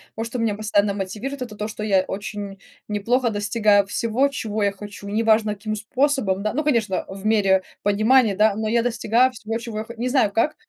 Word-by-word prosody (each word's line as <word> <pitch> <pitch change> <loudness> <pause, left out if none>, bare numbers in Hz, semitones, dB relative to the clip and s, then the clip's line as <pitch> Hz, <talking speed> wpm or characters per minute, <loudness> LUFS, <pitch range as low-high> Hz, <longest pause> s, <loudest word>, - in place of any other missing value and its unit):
вот 225 - -3
что 240 +2 -5
меня 225 -2 +1
постоянно 210 -1 +1
мотивирует- 215 +8 -5
это 230 -4 -6
то, 210 +1 -4
что 215 - -8
я 195 -3 +3
очень 200 0 -6 0.3
неплохо 235 +4 +1
достигаю 205 -1 +2
всего, 230 +6 +1
чего 220 -6 -4
я 200 - +2
хочу. 205 0 -10
Неважно, 215 0 +2
каким 215 +1 -4
способом, 220 -3 0
да, 215 - -1
ну, 305 - -1
конечно, 230 -10 0
в 195 +1 -9
мере 195 -3 +3 0.2
понимания, 215 +1 +3
да, 215 0 +4
но 220 0 -2
я 230 +1 +2
достигаю 240 +2 +2
всего, 225 -1 -4
чего 230 -2 -7
я - - -3
хо 235 - -9
не 250 +2 -1
знаю 245 -6 +2
как. 300 +9 +1
215 Hz, 200 wpm, -22 LUFS, 205-235 Hz, 0.3 s, да